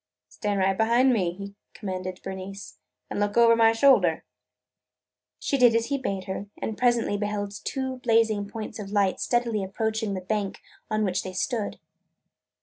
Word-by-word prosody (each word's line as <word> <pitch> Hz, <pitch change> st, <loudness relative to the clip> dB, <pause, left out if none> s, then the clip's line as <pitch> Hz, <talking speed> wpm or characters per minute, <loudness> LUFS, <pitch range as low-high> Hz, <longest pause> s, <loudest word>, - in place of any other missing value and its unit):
"Stand 205 Hz, -2 st, -2 dB
right 190 Hz, 0 st, +2 dB
behind 235 Hz, +5 st, +4 dB
me," 185 Hz, -7 st, +1 dB
he 200 Hz, +2 st, -8 dB, 0.2 s
commanded 185 Hz, -3 st, -5 dB
Bernice, 190 Hz, +1 st, -7 dB, 0.3 s
"and -, -, -2 dB
look 205 Hz, +2 st, 0 dB
over 230 Hz, -1 st, +7 dB
my 225 Hz, -1 st, +5 dB
shoulder!" 225 Hz, -, +4 dB, 1.1 s
She 275 Hz, -, -1 dB
did 240 Hz, -2 st, +6 dB
as 230 Hz, +1 st, +1 dB
he 280 Hz, -, +1 dB
bade 195 Hz, -7 st, -3 dB
her 190 Hz, +2 st, -5 dB
and 220 Hz, -, -3 dB
presently 240 Hz, -4 st, +2 dB
beheld 205 Hz, -1 st, -2 dB
two 260 Hz, -1 st, -3 dB
blazing 225 Hz, -4 st, +2 dB
points 220 Hz, 0 st, -6 dB
of 200 Hz, -2 st, -6 dB
light 200 Hz, -2 st, +1 dB
steadily 235 Hz, -4 st, 0 dB
approaching 220 Hz, +1 st, -2 dB
the 185 Hz, -, -4 dB
bank 200 Hz, +1 st, -2 dB, 0.3 s
on 215 Hz, 0 st, 0 dB
which 185 Hz, -1 st, 0 dB
they 185 Hz, -, -7 dB
stood. 215 Hz, +2 st, -2 dB
210 Hz, 160 wpm, -26 LUFS, 195-230 Hz, 1.1 s, over